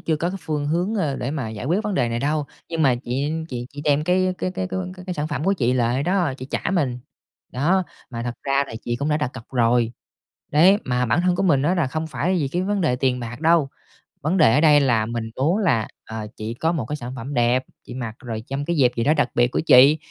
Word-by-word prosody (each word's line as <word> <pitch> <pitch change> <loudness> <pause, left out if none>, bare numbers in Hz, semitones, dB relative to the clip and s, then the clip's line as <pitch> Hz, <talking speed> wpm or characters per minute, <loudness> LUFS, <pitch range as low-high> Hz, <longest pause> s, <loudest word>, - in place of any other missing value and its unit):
chưa 160 -2 0
có 170 +3 -1
cái 195 - -5
phương 150 -2 -2
hướng, 175 +7 0
ơ, 155 -10 -1
để 125 - -3
mà 135 -7 -3
giải 110 +2 -6
quyết 175 +9 +1
vấn 210 - -1
đề 120 -9 +1
này 115 0 -2
đâu, 150 +3 0 0.2
nhưng 165 -1 -1
mà 135 -4 +4
chị 130 +4 -2 0.2
chị 120 -1 -5
chị 145 0 -8
đem 150 +1 +2
cái 185 +1 +2
cái 185 - -1
cái 185 0 -3
cái 185 -1 -5
cái 180 - -3
sản 150 +1 -2
phẩm 145 0 -3
của 195 - +3
chị 125 -9 +1
lại 125 +2 +1
đó, 180 -3 +1
chị 130 - -7
trả - - -1
mình. 135 -9 0 0.5
Đó, 170 +9 +2 0.3
mà 115 -1 -5
thật 120 0 -3
ra 140 0 +1
là 115 - -9
chị 120 0 -1
cũng 140 +3 -2
đã 150 - +2
đặt 150 -5 -1
cọc 120 -3 -9
rồi, 120 -1 +2 0.6
đấy, 175 +7 +6
mà 125 0 0
bản 120 +10 +2
thân 180 0 +2
của 195 - 0
mình 145 -8 +3
á 175 +5 +2
là 165 -6 +1
không 160 +4 -3
phải 180 +4 -1
vì 140 -4 0
cái 175 +5 -1
vấn 200 +1 0
đề 125 -7 +1
tiền 125 -1 0
bạc 120 +3 -7
đâu. 165 -3 +3 0.5
Vấn 160 +6 0
đề 135 -9 +5
ở 150 - +4
đây 150 -2 +6
là 115 -5 +2
mình 115 -1 -4
muốn 155 +9 +1
là, 155 - +1 0.2
ờ, 110 -1 -6
chị 110 +2 -5
có 160 +7 0
một 145 -10 -2
cái 150 - -3
sản 125 -3 -7
phẩm 130 +4 -6
đẹp, 120 +1 +2 0.2
chị - - -7
mặc 120 -3 -5
rồi 115 -3 -6
trong 140 +1 -3
cái 170 - -1
dịp 125 -5 +4
gì 115 - 0
đó 150 - +4
đặc 145 -5 +1
biệt 120 0 +4
của - - -2
chị, 145 0 +7
145 Hz, 270 wpm, -22 LUFS, 120-165 Hz, 0.6 s, chị